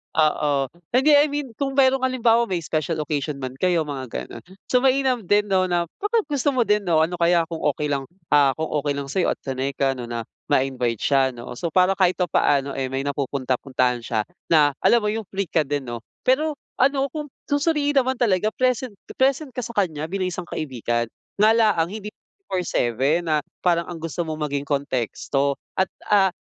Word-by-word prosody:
Oo. 145 -3 +2 0.2
Hindi, 280 +4 +5
I 290 +1 +5
mean 290 -3 -4
kung 275 -1 -1
merong 270 -1 +4
halimbawa 235 -2 +3
may 180 -4 -2
special 155 0 -1
occasion 145 -1 -2
man 130 0 -4
kayo, 175 -3 +2
mga 140 -3 -5 0.2
gano'n. - - -10 0.3
So, 250 - +5
mainam 265 -1 +2
din 205 0 +2
'no 185 -1 +3
na 175 -1 +1 0.2
pagkagusto 310 - 0
mo 250 - +4
din 210 -2 +1
'no, 160 -2 +4
ano 175 +2 -2
kaya 170 0 +4
kung 165 -1 -5 0.2
okey 150 -1 -2
lang, 135 -1 -2 0.2
ah, 140 -3 +5
kung 160 0 -3
okey 145 0 -1
lang 140 -1 -5
sa'yo 185 +3 +1
at - - -56
sanay 135 0 -3
ka 135 -2 +2
'no 125 -3 -6
na 115 -1 -4 0.2
ma-invite 130 -5 0
siya 135 -2 +2
'no. 120 +1 -9
So, 170 - -1
para 185 +3 +3
kahit 185 -2 +3 0.2
paano, 140 -1 +2
eh, 135 -1 -2
may 135 +1 -3
napupunta-puntahan 130 -3 -1
siya 115 -1 -1 0.3
na 150 -3 +5
alam 235 -2 +4
mo 210 - +1
yung 220 -2 -4
free 195 -3 -3
ka 155 -4 +2
din 145 -1 -1
'no? 120 -1 -5 0.2
Pero 300 +4 +2 0.2
ano 275 +1 +3
kung 300 -2 -5 0.2
susuriin 290 -1 +1
naman 260 0 0
talaga 215 -4 +1
present 255 -2 0 0.3
present 270 +2 +2
ka 250 - -5
sa 235 - -8
kanya 160 -6 0
bilang 185 +1 -2
isang 175 0 -6
kaibigan. 120 -5 -2 0.3
Nga 210 +2 +5
la 225 -1 +5
ang 165 0 +1
hindi 210 0 -6
24/7 170 - -1
na 155 -1 +2 0.2
parang 170 -1 +2
ang 170 - -6
gusto 165 +1 -3
mong 155 -2 -3
maging 140 0 -2
konteksto 140 0 -1 0.2
at, 190 -1 +2 0.2
ah, 195 -2 +5
170 Hz, 195 wpm, -23 LUFS, 140-235 Hz, 0.3 s, Hindi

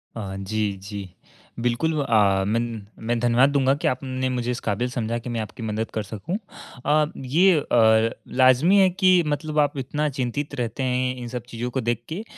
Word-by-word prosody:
अ, 100 -3 -5
जी, 105 +1 -1
जी। 100 -2 -7 0.5
बिल्कुल 120 +7 0
अ, 100 -5 +3
मैं 115 +2 +1
न 115 -4 -4 0.2
मैं 120 0 +1
धन्यवाद 120 +3 +4
दूँगा 135 -1 +3
कि - - -2
आपने 130 0 -2
मुझे 125 -1 -1
इस 125 - -3
काबिल 120 +5 0
समझा 115 -1 -2
कि 120 - -8
मैं 115 -1 -2
आपकी 110 +2 -8
मदद 110 +1 -3
कर 110 - -2
सकूँ। 110 - -5 0.5
अ, 150 +1 +4
ये 160 +6 +3
अ, 110 -4 +4 0.3
लाज़मी 130 +10 +5
है 190 -1 +6
कि 185 -1 +4
मतलब 150 +1 -1
आप 145 -1 +1
इतना 150 +3 -1
चिंतित 130 +3 -2
रहते 125 +2 -3
हैं 125 0 0
इन 120 -1 -6
सब 120 -1 -5
चीज़ों 120 +1 -4
को 130 - -1
देख 120 0 -1
के, 185 +7 -4
125 Hz, 195 wpm, -24 LUFS, 115-140 Hz, 0.5 s, है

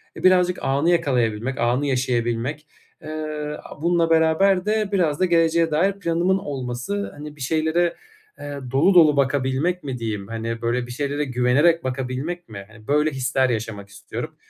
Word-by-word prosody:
Eee, - - -9
birazcık 180 -1 +4
anı 140 +5 +1
yakalayabilmek, 130 -7 0
anı 120 +4 +1
yaşayabilmek. 125 +2 -1 0.4
Eee, 155 - -8 0.5
aaa, - - -12
bununla 170 0 +2
beraber 165 +4 +3
de 215 -1 0
biraz 165 -7 +1
da 185 - +3
geleceğe 165 -1 +2
dair 180 +6 +2
planımın 175 +1 +1
olması, 140 +5 -4
hani, 150 0 -8
bir 150 - -14
şeylere, 160 +4 +1 0.4
eee, 145 -1 -6
dolu 155 +9 +4
dolu 155 -5 +6
bakabilmek 140 +6 0
mi 135 -3 -4
diyeyim? 105 -4 -4
Hani, 115 0 -4
böyle, 120 +1 -1
bir - - -8
şeylere 145 +3 -2
güvenerek 130 +7 +2
bakabilmek 130 +6 -4
mi? 100 -3 -8
Hani, 110 0 -17
böyle, 150 +2 +2
hisler 130 -1 0
yaşamak 110 -3 -4
istiyorum. 100 0 -7
145 Hz, 155 wpm, -22 LUFS, 125-170 Hz, 0.5 s, dolu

